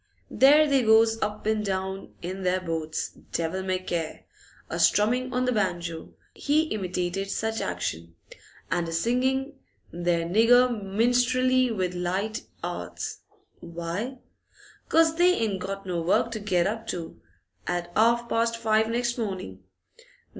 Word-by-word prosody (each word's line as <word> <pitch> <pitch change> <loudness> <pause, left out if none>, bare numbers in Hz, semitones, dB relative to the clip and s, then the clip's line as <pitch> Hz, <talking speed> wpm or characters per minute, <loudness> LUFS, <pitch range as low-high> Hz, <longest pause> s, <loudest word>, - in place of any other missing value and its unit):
There 295 +3 +6
they 275 -2 +3
goes 225 0 +4
up 210 0 -3
an' 215 0 +1
down 190 -1 -4
in 185 +2 -5
their 185 0 +1
boats, 160 -3 -3 0.2
devil 170 +3 -1
may 185 -1 -1
care, 170 -3 -4 0.4
a - - -4
strumming 250 +5 +3
on 250 0 0
the 250 - +1
banjo,' 175 -6 -2 0.2
he 300 +2 +2
imitated 185 -1 -2
such 220 +2 -2
action, 85 +1 -4 0.6
'and 175 -1 0
a 165 - -4
singing 260 - 0 0.3
their 175 -1 0
nigger 235 +7 +5
minstrelsy 245 +4 +2
with 185 -5 -1
light 185 +5 -2 0.2
'earts. - - -5 0.4
Why? 170 +9 -5 0.7
'Cause 325 0 +4
they 360 +1 +5
ain't 205 -4 -1
got 195 +1 -5
no 175 -2 -2
work 180 +7 +2
to 220 - -4
get 185 -4 +1
up 225 +1 -3
to 170 -2 -6 0.5
at 175 -1 -2
'arf 235 +2 +3
past 230 0 0
five 220 -1 +2
next 240 +1 -1
morning. 185 - -4
210 Hz, 140 wpm, -26 LUFS, 180-240 Hz, 0.7 s, There